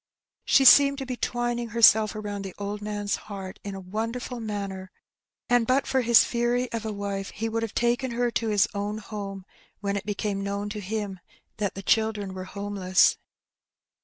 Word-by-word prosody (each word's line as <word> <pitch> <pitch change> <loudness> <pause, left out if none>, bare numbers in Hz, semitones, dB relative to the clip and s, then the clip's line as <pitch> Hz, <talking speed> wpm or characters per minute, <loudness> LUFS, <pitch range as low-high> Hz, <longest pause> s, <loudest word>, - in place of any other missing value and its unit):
She 270 - +5
seemed 280 +1 +8
to 270 - -4
be 255 -1 -4
twining 240 -1 -2
herself 220 -2 +5
around 205 -1 -4
the 195 -2 -7
old 205 +1 -4
man's 205 -1 -2
heart 190 -2 -7
in 200 -1 -5
a - - -6
wonderful 225 +6 -4
manner, 200 -4 -5 0.6
and 245 -2 +3
but 265 +2 +2
for 265 - +1
his 235 -1 +6
fury 240 +1 0
of 225 -1 -3
a - - -2
wife 200 -1 -4
he 225 +2 -4
would 225 0 -2
have 225 -2 -4
taken 240 +2 +1
her 240 0 0
to 230 - -1
his 210 -2 +3
own 205 +1 -3
home 200 -3 -7 0.3
when 200 -1 -2
it 200 - -4
became 205 -1 -2
known 200 +1 -3
to 210 0 -5
him 205 -1 -4 0.4
that 205 -2 -2
the 195 - -7
children 210 -2 +1
were 185 0 -6
home 200 +2 -6
less. 185 0 +4
210 Hz, 190 wpm, -26 LUFS, 200-235 Hz, 0.6 s, seemed